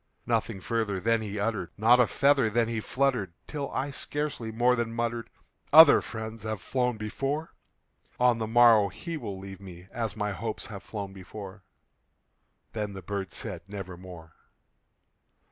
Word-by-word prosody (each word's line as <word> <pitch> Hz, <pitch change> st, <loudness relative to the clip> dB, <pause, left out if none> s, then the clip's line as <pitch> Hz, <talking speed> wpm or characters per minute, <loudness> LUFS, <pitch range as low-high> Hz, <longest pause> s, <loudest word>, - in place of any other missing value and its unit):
Nothing 95 Hz, -, 0 dB
further 110 Hz, -1 st, -1 dB
then 115 Hz, +3 st, +2 dB
he 105 Hz, -1 st, -4 dB
uttered 100 Hz, -4 st, -1 dB
not 115 Hz, +4 st, +5 dB
a 125 Hz, -, +5 dB
feather 135 Hz, -3 st, +3 dB
then 115 Hz, +1 st, +2 dB
he 115 Hz, -1 st, -2 dB
fluttered 125 Hz, -6 st, 0 dB
Till 145 Hz, -2 st, -4 dB
I 140 Hz, +2 st, -2 dB
scarcely 140 Hz, -5 st, -3 dB
more 120 Hz, +3 st, +3 dB
than 115 Hz, -1 st, -2 dB
muttered, 115 Hz, 0 st, -2 dB, 0.4 s
"Other 155 Hz, -1 st, +9 dB
friends 110 Hz, 0 st, -6 dB
have 110 Hz, -1 st, -3 dB
flown 125 Hz, +3 st, -1 dB
before 135 Hz, +9 st, -3 dB, 0.7 s
On 125 Hz, -2 st, +4 dB
the 110 Hz, -, -2 dB
morrow 115 Hz, -2 st, +6 dB
he 170 Hz, -, -6 dB
will 110 Hz, -10 st, -5 dB
leave 95 Hz, 0 st, -9 dB
me, 90 Hz, -1 st, -11 dB
as 115 Hz, -3 st, -3 dB
my 105 Hz, -1 st, -1 dB
hopes 110 Hz, +2 st, -4 dB
have 100 Hz, -3 st, -8 dB
flown 100 Hz, -2 st, -6 dB
before." 95 Hz, +1 st, -9 dB, 1.1 s
Then 105 Hz, -2 st, -3 dB
the 95 Hz, -2 st, -8 dB
bird 100 Hz, 0 st, -4 dB
said, -, -, -5 dB
"Nevermore." 90 Hz, -4 st, -9 dB
110 Hz, 155 wpm, -28 LUFS, 100-120 Hz, 1.1 s, Other